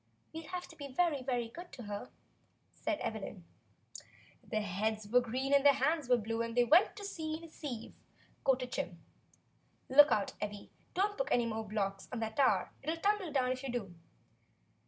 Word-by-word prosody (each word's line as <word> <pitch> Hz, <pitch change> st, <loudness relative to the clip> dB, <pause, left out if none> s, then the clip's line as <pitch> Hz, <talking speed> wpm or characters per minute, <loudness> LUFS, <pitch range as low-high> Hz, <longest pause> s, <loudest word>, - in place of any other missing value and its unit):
"We'll 320 Hz, -1 st, -7 dB
have 360 Hz, -1 st, -5 dB
to 325 Hz, -, -13 dB
be 285 Hz, -2 st, -7 dB
very, 290 Hz, +1 st, +1 dB
very 245 Hz, -2 st, -1 dB
good 345 Hz, +9 st, -10 dB
to 255 Hz, -4 st, -8 dB
her," 205 Hz, -1 st, -5 dB, 0.6 s
said 315 Hz, -2 st, -2 dB
Evelyn. 200 Hz, -4 st, -4 dB, 1.0 s
"Their 215 Hz, -1 st, -2 dB
heads 210 Hz, +2 st, -1 dB
were 250 Hz, +4 st, +5 dB
green 260 Hz, +4 st, -1 dB
and 280 Hz, -1 st, +6 dB
their 285 Hz, -1 st, +7 dB
hands 290 Hz, 0 st, +1 dB
were 250 Hz, -, +6 dB
blue, 225 Hz, +1 st, -2 dB
and 230 Hz, +1 st, -3 dB
they 245 Hz, -, +7 dB
went 320 Hz, -, +5 dB
to 405 Hz, -, -7 dB
sea 315 Hz, -5 st, -3 dB
in 330 Hz, -, -14 dB
a -, -, -8 dB
sieve," 255 Hz, -8 st, -6 dB, 0.5 s
quoted 255 Hz, -2 st, +1 dB
Jim. 175 Hz, -7 st, -3 dB, 0.9 s
"Look 290 Hz, +3 st, +8 dB
out, 205 Hz, -2 st, +1 dB
Evvy, 205 Hz, -1 st, -5 dB, 0.2 s
don't 410 Hz, +4 st, +1 dB
put -, -, +1 dB
any 240 Hz, -1 st, +3 dB
more 220 Hz, -1 st, -3 dB
blocks 195 Hz, -1 st, -2 dB
on 250 Hz, -, -3 dB
that 220 Hz, 0 st, -3 dB
tower; 275 Hz, -2 st, +3 dB
it'll 315 Hz, +4 st, -2 dB
tumble 400 Hz, -1 st, +1 dB
down 255 Hz, -3 st, +2 dB
if 255 Hz, 0 st, -3 dB
you 270 Hz, -2 st, -4 dB
do." 210 Hz, -7 st, -3 dB
255 Hz, 190 wpm, -34 LUFS, 220-310 Hz, 1.0 s, Look